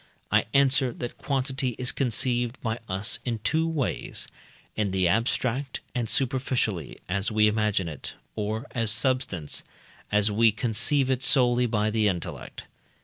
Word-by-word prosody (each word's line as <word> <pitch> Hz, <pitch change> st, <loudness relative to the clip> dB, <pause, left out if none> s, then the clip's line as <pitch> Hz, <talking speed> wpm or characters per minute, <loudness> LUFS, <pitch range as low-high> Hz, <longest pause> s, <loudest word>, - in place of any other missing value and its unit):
I -, -, +4 dB
answer, 135 Hz, -1 st, +4 dB
that 120 Hz, +1 st, -6 dB
quantity 135 Hz, -2 st, -1 dB
is 125 Hz, 0 st, +2 dB
conceived 120 Hz, 0 st, 0 dB
by 115 Hz, 0 st, -1 dB
us 95 Hz, +2 st, +1 dB
in 120 Hz, -2 st, -2 dB
two 160 Hz, +8 st, +2 dB
ways; 155 Hz, -5 st, -2 dB, 0.5 s
in 105 Hz, -2 st, 0 dB
the 95 Hz, -1 st, +2 dB
abstract 125 Hz, +6 st, 0 dB
and 120 Hz, -3 st, -1 dB
superficially, 125 Hz, -, 0 dB
as 100 Hz, +4 st, 0 dB
we 105 Hz, 0 st, +4 dB
imagine 105 Hz, -4 st, +1 dB
it; 75 Hz, -4 st, -5 dB, 0.2 s
or 110 Hz, +3 st, -2 dB
as 115 Hz, -3 st, 0 dB
substance, 115 Hz, -, 0 dB, 0.5 s
as 105 Hz, 0 st, +3 dB
we 110 Hz, +2 st, +5 dB
conceive 130 Hz, +4 st, 0 dB
it 130 Hz, -1 st, 0 dB
solely 125 Hz, -2 st, +4 dB
by 110 Hz, -1 st, +1 dB
the 110 Hz, -1 st, +2 dB
intellect. 90 Hz, -4 st, -4 dB
115 Hz, 145 wpm, -26 LUFS, 105-130 Hz, 0.5 s, we